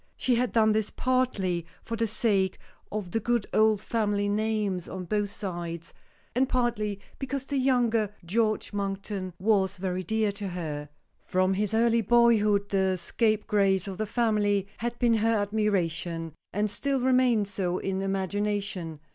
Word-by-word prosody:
She 255 Hz, -, +1 dB
had 245 Hz, +1 st, +1 dB
done 220 Hz, -1 st, +4 dB
this, 215 Hz, -1 st, 0 dB
partly 230 Hz, -9 st, 0 dB, 0.2 s
for 230 Hz, -, -4 dB
the 230 Hz, 0 st, 0 dB
sake 200 Hz, -3 st, +1 dB, 0.3 s
of 205 Hz, -4 st, -4 dB
the 225 Hz, -, +1 dB
good 235 Hz, 0 st, 0 dB
old 215 Hz, -1 st, +4 dB
family 205 Hz, -3 st, 0 dB
names 210 Hz, -3 st, -1 dB
on 185 Hz, -1 st, -5 dB
both 205 Hz, +3 st, 0 dB
sides, 170 Hz, -5 st, -5 dB, 0.4 s
and 260 Hz, +2 st, +2 dB
partly 220 Hz, -5 st, 0 dB, 0.2 s
because 270 Hz, 0 st, -3 dB
the 280 Hz, -1 st, -1 dB
younger 235 Hz, -5 st, +2 dB
George 215 Hz, +3 st, 0 dB
Monkton 195 Hz, -1 st, -3 dB
was 195 Hz, -1 st, +2 dB
very 185 Hz, 0 st, -2 dB
dear 215 Hz, +3 st, 0 dB
to 200 Hz, 0 st, -5 dB
her. 155 Hz, -5 st, -5 dB, 0.3 s
From 185 Hz, +1 st, +1 dB
his 210 Hz, +2 st, 0 dB
early 230 Hz, 0 st, +3 dB
boyhood 215 Hz, -3 st, +4 dB
the 190 Hz, -1 st, +2 dB
scapegrace 200 Hz, 0 st, +1 dB
of 195 Hz, 0 st, -6 dB
the 215 Hz, -, -1 dB
family 205 Hz, -4 st, +1 dB
had 240 Hz, +1 st, -3 dB
been 240 Hz, -1 st, +3 dB
her 225 Hz, +1 st, +2 dB
admiration, 180 Hz, -6 st, -1 dB, 0.2 s
and 210 Hz, +2 st, 0 dB
still 275 Hz, +6 st, -1 dB
remained 250 Hz, -4 st, +3 dB
so, 190 Hz, -3 st, -1 dB
in 195 Hz, 0 st, -2 dB
imagination. 195 Hz, -3 st, -2 dB
205 Hz, 150 wpm, -27 LUFS, 190-225 Hz, 0.4 s, done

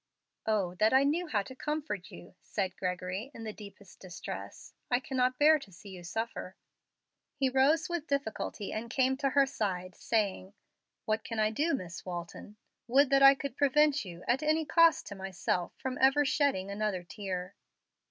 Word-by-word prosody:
"Oh 200 Hz, -5 st, +1 dB
that 215 Hz, +3 st, +4 dB
I 265 Hz, +1 st, +6 dB
knew 325 Hz, +5 st, +1 dB
how 210 Hz, -9 st, 0 dB
to 260 Hz, -, -10 dB
comfort 295 Hz, -, -4 dB
you!" 175 Hz, -, -12 dB
said 190 Hz, -3 st, -3 dB
Gregory, 185 Hz, +5 st, -3 dB
in 225 Hz, -, -8 dB
the 215 Hz, -1 st, -5 dB
deepest 200 Hz, -2 st, -13 dB
distress. 180 Hz, -3 st, -8 dB, 0.2 s
"I 245 Hz, -, +3 dB
cannot 255 Hz, -1 st, 0 dB
bear 305 Hz, +1 st, +6 dB
to 210 Hz, -8 st, -13 dB
see 200 Hz, +3 st, -13 dB
you 185 Hz, -2 st, -9 dB
suffer." 205 Hz, -1 st, -4 dB, 0.8 s
He 270 Hz, -2 st, +1 dB
rose 280 Hz, +5 st, +3 dB
with 345 Hz, -3 st, -3 dB
difficulty 275 Hz, -7 st, -3 dB
and 230 Hz, +2 st, -4 dB
came 260 Hz, +1 st, +2 dB
to 275 Hz, 0 st, +1 dB
her 275 Hz, +1 st, +4 dB
side, 185 Hz, -8 st, -3 dB
saying, 200 Hz, -3 st, -1 dB, 0.5 s
"What 220 Hz, 0 st, 0 dB
can 230 Hz, -, -5 dB
I 215 Hz, 0 st, +2 dB
do, 300 Hz, +7 st, +1 dB
Miss 180 Hz, -8 st, -7 dB
Walton? 175 Hz, +3 st, -7 dB, 0.3 s
Would 275 Hz, +3 st, +4 dB
that 275 Hz, 0 st, +5 dB
I 275 Hz, 0 st, +9 dB
could 275 Hz, -1 st, -5 dB
prevent 295 Hz, +1 st, +3 dB
you, 175 Hz, -3 st, -10 dB
at 245 Hz, +4 st, +2 dB
any 310 Hz, +1 st, +1 dB
cost 335 Hz, +2 st, +4 dB
to -, -, -7 dB
myself, 190 Hz, -2 st, -2 dB
from 260 Hz, -1 st, -4 dB
ever 275 Hz, +2 st, +5 dB
shedding 270 Hz, -10 st, +1 dB
another 200 Hz, -3 st, -2 dB
tear!" 185 Hz, -1 st, -5 dB
225 Hz, 175 wpm, -31 LUFS, 190-275 Hz, 0.8 s, I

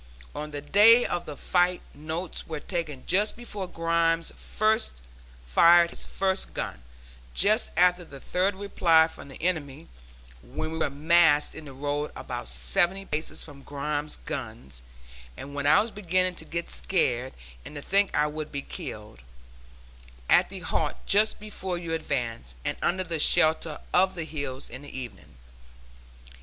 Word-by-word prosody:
On 150 Hz, +1 st, -5 dB
the 145 Hz, -1 st, -6 dB
day 215 Hz, +9 st, +6 dB
of 175 Hz, -, -3 dB
the 150 Hz, -2 st, -7 dB
fight 180 Hz, 0 st, +1 dB
notes 160 Hz, +4 st, -5 dB
were 155 Hz, -2 st, -4 dB
taken 155 Hz, -6 st, -5 dB
just 205 Hz, +4 st, +2 dB
before 210 Hz, -5 st, -7 dB
Grimes 165 Hz, -1 st, +1 dB
fired 65 Hz, -, +2 dB
his -, -, 0 dB
first 190 Hz, 0 st, -2 dB
gun, -, -, -4 dB, 0.5 s
just 215 Hz, +3 st, +3 dB
after 180 Hz, 0 st, +4 dB
the 140 Hz, -4 st, -12 dB
third 185 Hz, +7 st, 0 dB
reply 170 Hz, -5 st, +3 dB
from 160 Hz, -, -12 dB
the 135 Hz, -, -12 dB
enemy 155 Hz, -4 st, -2 dB, 0.5 s
when 155 Hz, -, -5 dB
we 160 Hz, -, -4 dB
were -, -, +1 dB
massed 150 Hz, +1 st, +4 dB
in 160 Hz, -, -9 dB
the 140 Hz, -, -10 dB
road 145 Hz, +2 st, -3 dB
about -, -, -6 dB
seventy 65 Hz, -, +1 dB
paces 155 Hz, -1 st, -2 dB
from 145 Hz, -3 st, -13 dB
Grimes' 145 Hz, +1 st, -3 dB
guns, 110 Hz, -, -7 dB, 0.6 s
and 140 Hz, +1 st, -8 dB
when 145 Hz, 0 st, -2 dB
I 150 Hz, -, +6 dB
was 220 Hz, +2 st, -1 dB
beginning 185 Hz, -2 st, 0 dB
to 160 Hz, -, -5 dB
get 170 Hz, +1 st, -4 dB
scared 130 Hz, -8 st, 0 dB, 0.3 s
and -, -, -11 dB
to 145 Hz, -, -6 dB
think 200 Hz, 0 st, +2 dB
I 150 Hz, -, +4 dB
would 150 Hz, 0 st, -5 dB
be 140 Hz, -1 st, -4 dB
killed 105 Hz, -, -8 dB, 1.1 s
at -, -, +5 dB
the -, -, -8 dB
halt -, -, -1 dB
just 210 Hz, +2 st, +4 dB
before 190 Hz, -4 st, -5 dB
you 170 Hz, -1 st, -5 dB
advanced, 115 Hz, -, -3 dB
and -, -, -1 dB
under 185 Hz, +1 st, +1 dB
the 165 Hz, -3 st, -3 dB
shelter 155 Hz, 0 st, +4 dB
of 190 Hz, +1 st, +3 dB
the 170 Hz, -, -4 dB
hills 140 Hz, -4 st, -5 dB
in 130 Hz, +3 st, -9 dB
the 145 Hz, -2 st, -8 dB
evening. 120 Hz, -, -10 dB
160 Hz, 155 wpm, -27 LUFS, 140-180 Hz, 1.1 s, day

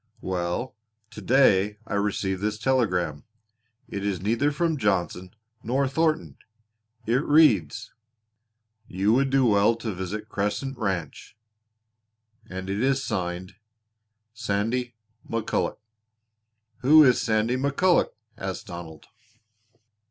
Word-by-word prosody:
"Well, 90 Hz, +6 st, -3 dB, 0.4 s
to 105 Hz, -, -9 dB
day 105 Hz, -3 st, +3 dB
I 110 Hz, -, -6 dB
received 100 Hz, -2 st, -1 dB
this 105 Hz, 0 st, -1 dB
telegram. 90 Hz, -, 0 dB, 0.6 s
It 100 Hz, -, -5 dB
is 100 Hz, -3 st, -1 dB
neither 115 Hz, +9 st, +1 dB
from 160 Hz, +1 st, 0 dB
Johnson 95 Hz, -2 st, -1 dB, 0.3 s
nor 135 Hz, +4 st, 0 dB
Thornton. 155 Hz, +3 st, -1 dB, 0.7 s
It 125 Hz, +5 st, +1 dB
reads: 145 Hz, -, +3 dB, 0.9 s
"'You 100 Hz, +4 st, +1 dB
would 135 Hz, +2 st, +2 dB
do 135 Hz, -1 st, +3 dB
well 105 Hz, 0 st, +4 dB
to 115 Hz, -2 st, -5 dB
visit 95 Hz, +4 st, -5 dB
Crescent 105 Hz, +7 st, -2 dB
Ranch,' 95 Hz, -, -4 dB, 1.1 s
and 95 Hz, 0 st, -6 dB
it 100 Hz, +2 st, -2 dB
is 135 Hz, +1 st, +1 dB
signed 90 Hz, -1 st, -4 dB, 0.8 s
'Sandy 115 Hz, +3 st, -2 dB, 0.3 s
McCulloch.'" 115 Hz, -1 st, -1 dB, 1.0 s
"Who 155 Hz, +4 st, +7 dB
is 125 Hz, -3 st, +4 dB
Sandy 110 Hz, +1 st, +1 dB
McCulloch?" 140 Hz, +7 st, +2 dB, 0.3 s
asked 95 Hz, +3 st, -5 dB
Donald. 85 Hz, -5 st, -9 dB
110 Hz, 105 wpm, -25 LUFS, 95-130 Hz, 1.1 s, Who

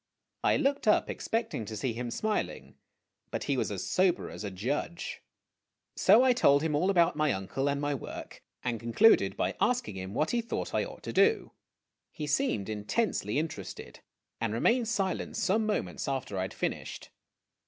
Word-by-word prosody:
I -, -, +4 dB
looked 275 Hz, -3 st, 0 dB
up, 210 Hz, -, +4 dB
expecting 225 Hz, -, -2 dB
to 110 Hz, 0 st, -6 dB
see 120 Hz, +3 st, -1 dB
him 120 Hz, +1 st, -4 dB
smiling, 215 Hz, -, -2 dB, 0.6 s
but -, -, -3 dB
he -, -, 0 dB
was -, -, 0 dB
as -, -, -4 dB
sober 185 Hz, -1 st, +1 dB
as -, -, -7 dB
a 100 Hz, -, -3 dB
judge. 130 Hz, -, -3 dB, 0.7 s
So 215 Hz, +6 st, +6 dB
I 260 Hz, -1 st, +5 dB
told 140 Hz, -, +4 dB
him 160 Hz, -2 st, 0 dB
all 165 Hz, +6 st, +2 dB
about 170 Hz, -4 st, +4 dB
my 150 Hz, -1 st, +2 dB
uncle 110 Hz, +9 st, -1 dB
and 140 Hz, 0 st, 0 dB
my 145 Hz, 0 st, 0 dB
work, 135 Hz, -, -7 dB, 0.2 s
and 120 Hz, -2 st, -1 dB
concluded 120 Hz, -, +4 dB
by -, -, 0 dB
asking 245 Hz, -, +1 dB
him 95 Hz, +2 st, -6 dB
what 155 Hz, -, +1 dB
he 240 Hz, -, +1 dB
thought 230 Hz, -, -4 dB
I -, -, +2 dB
ought -, -, -11 dB
to -, -, -5 dB
do. 445 Hz, -1 st, +3 dB, 0.6 s
He 150 Hz, -, -5 dB
seemed 140 Hz, -8 st, 0 dB
intensely 105 Hz, -, -1 dB
interested, 150 Hz, -, -5 dB, 0.4 s
and 115 Hz, -2 st, -1 dB
remained 235 Hz, -, +2 dB
silent 195 Hz, -5 st, -1 dB
some 215 Hz, +3 st, +1 dB
moments 210 Hz, -, -2 dB
after 130 Hz, -5 st, -2 dB
I 95 Hz, -, -1 dB
had 95 Hz, -, -3 dB
finished. -, -, -4 dB
145 Hz, 175 wpm, -30 LUFS, -, 0.7 s, So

